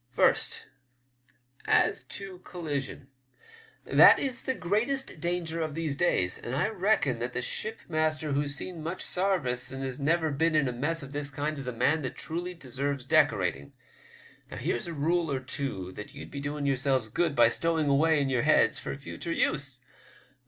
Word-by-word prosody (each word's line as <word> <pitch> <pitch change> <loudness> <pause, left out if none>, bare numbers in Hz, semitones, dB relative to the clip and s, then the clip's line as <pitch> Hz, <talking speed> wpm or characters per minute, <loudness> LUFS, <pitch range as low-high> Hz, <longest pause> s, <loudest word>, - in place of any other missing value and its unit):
First, - - +2 1.0
as - - +3
to 195 -2 -8
collision. 145 -7 -5 0.8
That - - +8
is 260 -2 -1
the 260 - 0
greatest 230 - -1
danger 170 0 -2
of 155 -2 -3
these 160 -4 -2
days, 95 - +1
and 120 - -4
I 140 - +1
reckon 215 +1 +1
that - - -3
the - - -1
shipmaster 160 - -2
who's 145 0 0
seen 170 +3 -5
much 165 +4 -4
sarvice 140 -10 0
and 135 0 -5
has 130 0 -4
never 160 +2 +1
been 160 +3 +1
in 145 -3 +3
a - - -1
mess 150 +6 -1
of 135 - -9
the 145 0 -2
kind 145 +2 -2
is 135 - -6
a - - -1
man 130 +7 +1
that 130 - -4
truly 175 +3 -4
deserves 140 -2 -3
decorating. 95 - +2 0.8
Now, - - -7
here's 120 - -2
a 170 - -4
rule 165 +2 0
or 135 - 0
two 130 -8 -4
that 105 +3 -9
ye'd - - -9
be 140 - -5
doing 145 0 -3
yourselves 135 -3 +1
good 160 +6 0
by - - +6
stowing 165 -2 +1
away 150 +3 +4
in 140 - +1
your 130 -3 +1
heads - - +4
for - - -5
future 145 +4 -6
use. 135 -5 -1
150 Hz, 175 wpm, -28 LUFS, 135-170 Hz, 1.0 s, That